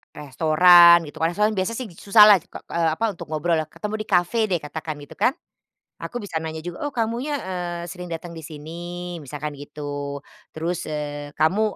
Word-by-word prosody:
restoran 170 +4 +6
gitu, 145 - -11
kalo 165 - +3
restoran 210 +4 +1
biasa 190 +3 -1
sih 255 - -4
susah 210 +5 +6
lah 210 -2 +8
kok 185 - -26 0.2
ke, - - -12
eee, 165 -1 +2
apa 225 - -5
untuk 175 - -10
ngobrol 160 +2 0
ya. 155 - -3
Ketemu 210 +6 -5
di 215 - -7
kafe 180 +4 +2
deh 180 - +2
katakan 155 +1 -6
gitu - - -12
kan, 260 - +3 0.7
aku 245 - -5
bisa 205 -6 -8
nanya 160 0 -5
juga, 175 +9 -6
"Oh, 290 - -2
kamunya, 240 +5 -1
eee, 175 -3 -4
sering 180 0 -8
datang 170 +1 -6
di 160 - -8
sini?" 150 0 -9 0.5
Misalkan 150 +2 -5
gitu. 145 0 -6 0.3
Terus 165 +2 -3
eee, 145 -1 -5
"Kamu 160 +7 +2
170 Hz, 195 wpm, -23 LUFS, 150-195 Hz, 0.7 s, lah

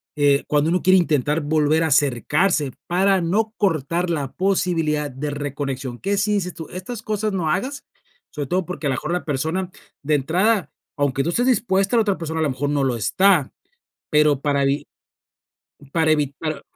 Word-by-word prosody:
eh, 145 -1 +3
cuando 150 +1 +2
uno 180 0 +1
quiere 185 +1 +5
intentar 150 -3 +1
volver 155 +1 +2
a - - +1
acercarse 145 - +2 0.2
para 190 +2 +2
no 215 +6 0
cortar 170 -2 0
la 145 -6 -2
posibilidad 165 -6 0
de 140 +4 -4
reconexión?" 140 -3 -4
¿Qué 200 +1 -1
sí 205 +1 +1
dices 180 -4 -2
tú?, 160 - -8
estas 205 +5 -7
cosas 215 -1 -1
no 175 -5 -1
hagas, 265 - -3 0.5
sobre 145 -2 -4
todo 180 +4 0
porque 180 -4 -4
a - - +1
la - - +1
mejor 155 +6 -4
la 180 0 -1
persona, 160 +6 -2 0.3
de 150 +1 +1
entrada, 185 +9 +1 0.3
aunque 140 -2 +1
tú 165 - -1
estés 240 +8 +1
dispuesta, 215 -4 +2
la 230 - +5
otra 205 -3 0
persona, 160 -1 -4
a - - +2
lo 150 - +1
mejor 135 +2 -2
no 145 -1 +1
lo 130 -2 +1
está, 175 - +2 0.6
pero, 150 -2 +3
para 140 -1 +1
evi 140 +1 0 1.1
para 160 -2 +2
evi 145 -2 0
para 155 -1 -4
160 Hz, 185 wpm, -22 LUFS, 145-190 Hz, 1.1 s, quiere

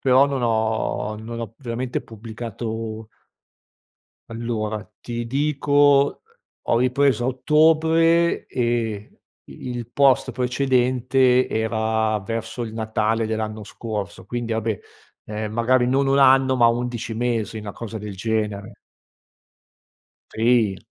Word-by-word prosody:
però 130 +1 +5
non 135 -3 -2
ho 110 -2 0
non 115 +1 -7
ho 115 -2 -6
veramente 125 -1 -3
pubblicato 110 0 -6 1.2
Allora, 110 -2 -4
ti 120 -1 -5
dico, 145 +1 +2 0.4
ho 115 - +1
ripreso 130 0 +2
a - - +1
ottobre 160 +5 +3
e 115 -4 -2 0.3
i 70 - -10
il 120 -1 -6
post 135 0 +3
precedente 125 0 +2
era 110 -1 0
verso 115 +2 -4
il 110 - -5
Natale 110 0 0
dell'anno 110 -1 -3
scorso, 105 -4 -6
quindi, 120 +1 -4
vabbè, 110 -2 -1 0.5
ehm, 105 0 -5
magari 120 +2 +2
non 135 +2 +2
1 135 +1 +3
anno, 135 0 +5
ma 120 -2 +5
11 120 -1 -2
mesi, 115 -2 -1
una 105 -1 -7
cosa 115 -1 -7
del 105 -1 -7
genere. 105 0 -2 1.6
Sì. 115 -3 +2
115 Hz, 115 wpm, -22 LUFS, 110-130 Hz, 1.6 s, però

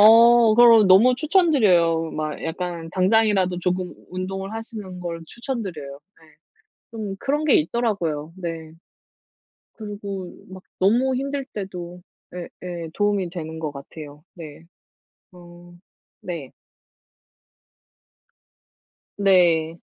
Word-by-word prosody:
어 230 +1 +7
그럼 230 -4 +7
너무 225 +7 +6
추천드려요. 215 - +3
막 155 -1 -4
약간 170 0 -5
당장이라도 190 -1 +2
조금 180 0 -2 0.2
운동을 190 +1 -5
하시는 220 -4 -7
걸 170 -2 -5
추천드려요. 180 - -6 0.2
네. 160 - -20 0.7
좀 215 -4 -5
그런 295 +3 -1
게 300 -4 +4
있더라고요. 165 -6 -1
네. 165 -3 -6 1.0
그리고 200 -4 -7
막 190 0 -10 0.2
너무 240 +7 +2
힘들 275 +1 -3
때도 180 -3 -7 0.3
예예. 175 -1 -7
도움이 205 -3 0
되는 160 -2 -7
것 155 -2 -4
같아요. 145 +1 -11
네. 160 -2 -11 0.7
어. 175 0 -15 0.4
네. 165 -7 -6 2.7
네. 170 -4 +3
185 Hz, 205 characters per minute, -22 LUFS, 165-220 Hz, 2.7 s, 어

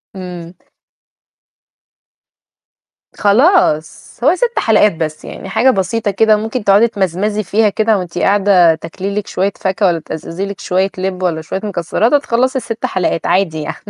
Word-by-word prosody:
امم. 180 -2 -8 2.7
خلاص 205 - +2
هو 305 +7 +4
6 475 +4 -1
حلقات 210 -3 +3
بس 155 -1 -5
يعني، - - -9
حاجة 225 +6 +3
بسيطة 205 +1 -1
كده، 215 +2 +3
ممكن 220 +2 -4
تقعدي 205 +3 +4
تمزمزي 205 +1 -2
فيها 210 +3 +2
كده، 220 +1 +1
وأنتِ 180 -2 -6
قاعدة 190 -4 +4
تاكلي 185 +5 -6
لِك 210 -1 -3
شوية 195 +2 -1
فاكهة، 190 +1 0
ولا 170 -2 +1
تأزأزي 165 +4 -6
لِك 200 0 -7
شوية 190 +2 0
لِبّ 185 0 -3
والَّا 165 -3 -1
شوية 190 +4 -5
مكسّرات، 205 - -1
وتخلّصي 260 -2 +1
ال6 230 -3 -4
حلقات 180 -2 -1
عادي 175 -4 0
يعني. 150 - -5
195 Hz, 145 wpm, -15 LUFS, 180-220 Hz, 2.7 s, هو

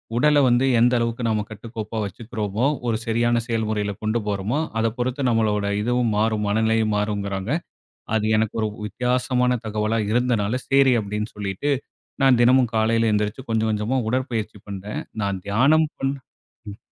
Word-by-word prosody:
உடல 150 +4 +4
வந்து 120 +2 +3
எந்த 120 +2 +4
அளவுக்கு 115 +1 -2
நாம 105 -1 0
கட்டுக்கோப்பா 110 0 -6
வச்சுக்கறோமோ, 110 +1 -3 0.2
ஒரு 110 -2 +1
சரியான 120 +1 +1
செயல்முறையில 110 -3 -1
கொண்டு 110 +2 +1
போறோமோ 105 +7 -1 0.2
அதை 115 0 +2
பொறுத்து 130 +3 -2
நம்மளோட 110 -3 +1 0.2
இதுவும் 120 0 +1
மாறும், 110 -1 +1
மனநிலையும் 110 +1 +1
மாறும்ங்கறாங்க. 100 0 -2 0.7
அது 110 -1 0
எனக்கு 110 -1 0
ஒரு 110 - +1 0.2
வித்தியாசமான 125 +2 0
தகவலா 110 +1 -1
இருந்தனால, 120 0 +1
சரி 135 -1 +5
அப்படீன்னு 105 +1 -4
சொல்லீட்டு, 100 +8 -2 0.5
நான் 130 -3 +5
தினமும் 125 -1 +4
காலையில 115 0 +2
எந்திருச்சு 105 +5 -2
கொஞ்ச 110 -1 +1
கொஞ்சமா 110 +5 0
உடற்பயிற்சி 115 -5 -2
பண்ணுறேன். 100 +1 -5 0.2
நான் 100 -1 -1
தியானம் 145 +10 +4
பண் 135 0 -1 0.6
ம். 100 - -10
110 Hz, 140 wpm, -23 LUFS, 105-125 Hz, 0.7 s, சரி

